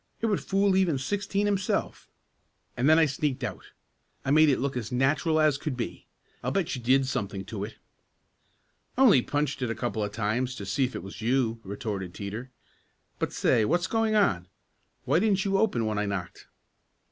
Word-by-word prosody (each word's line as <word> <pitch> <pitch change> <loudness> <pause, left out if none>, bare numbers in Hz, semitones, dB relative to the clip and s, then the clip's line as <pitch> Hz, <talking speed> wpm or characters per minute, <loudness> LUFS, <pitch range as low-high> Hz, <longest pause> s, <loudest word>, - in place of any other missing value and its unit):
It - - -1
would 210 -3 +1
fool 195 0 +2
even 180 -6 +2
Sixteen 200 +7 -1
himself; 200 -2 -1 0.7
and 125 +4 +2
then 160 - +7
I 165 - +6
sneaked 145 -1 -2
out. - - -5 0.6
I 135 - 0
made 155 +1 +6
it 135 - +3
look 140 +1 -2
as 115 -3 -4
natural 145 +5 +2
as 150 -3 +3
could 140 -4 -3
be. 120 - -5 0.4
I'll - - 0
bet 190 -7 -1
you 125 - -6
did 130 +3 +3
something 100 -7 -3
to 100 0 -5
it." 110 +1 -7 1.2
"Only 250 - +6
punched 145 +1 -2
it 125 - -1
a 115 - -2
couple 110 -1 -2
of 105 - -3
times 115 +4 -1
to 100 - -7
see 135 +7 +1
if 125 - -6
it - - -5
was 95 +3 -9
you," 115 -1 +1
retorted 100 -3 -5
Teeter. 110 +5 -6 0.7
"But - - -1
say, 110 - +2
what's 175 +9 +1
going 225 +3 +1
on? 95 - +2 0.6
Why - - +3
didn't 200 -1 +2
you 195 0 +2
open 160 - +1
when 105 -1 -1
I 105 - -1
knocked?" 95 -4 -5
130 Hz, 190 wpm, -27 LUFS, 110-170 Hz, 1.2 s, then